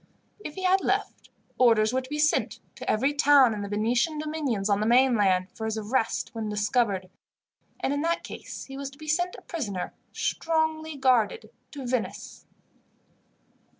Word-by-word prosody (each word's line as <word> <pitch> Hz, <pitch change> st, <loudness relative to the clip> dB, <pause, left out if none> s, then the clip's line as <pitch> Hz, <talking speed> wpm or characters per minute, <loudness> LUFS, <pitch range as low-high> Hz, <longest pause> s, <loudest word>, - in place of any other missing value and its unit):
If 300 Hz, -8 st, -8 dB
he 375 Hz, -, -6 dB
had 375 Hz, +1 st, +4 dB
left, -, -, -2 dB, 0.3 s
orders 225 Hz, -2 st, +4 dB
were 260 Hz, -, +1 dB
to 255 Hz, -, -13 dB
be 300 Hz, -, -3 dB
sent, 305 Hz, +1 st, +1 dB
to -, -, -7 dB
every 265 Hz, +7 st, +2 dB
town 285 Hz, -4 st, +5 dB
in 210 Hz, -, -4 dB
the 200 Hz, -, -4 dB
Venetian 235 Hz, +9 st, +1 dB
dominions 300 Hz, -10 st, -2 dB
on 200 Hz, -1 st, +2 dB
the 215 Hz, -, 0 dB
mainland, 210 Hz, -7 st, +3 dB
for 220 Hz, -, -5 dB
his 220 Hz, 0 st, -2 dB
arrest 220 Hz, +2 st, -1 dB
when 220 Hz, -2 st, -4 dB
discovered, 210 Hz, -2 st, 0 dB, 0.7 s
and 275 Hz, -, 0 dB
in 285 Hz, -, -1 dB
that 335 Hz, +2 st, 0 dB
case -, -, -8 dB
he 270 Hz, -, -9 dB
was 275 Hz, -1 st, -4 dB
to 275 Hz, -, -17 dB
be 310 Hz, -, -11 dB
sent 350 Hz, +4 st, 0 dB
a -, -, -13 dB
prisoner, 210 Hz, -, -4 dB, 0.2 s
strongly 315 Hz, -1 st, -1 dB
guarded, 235 Hz, -5 st, +2 dB, 0.2 s
to 280 Hz, -3 st, -6 dB
Venice. 245 Hz, -1 st, -4 dB
255 Hz, 170 wpm, -27 LUFS, 215-300 Hz, 0.7 s, town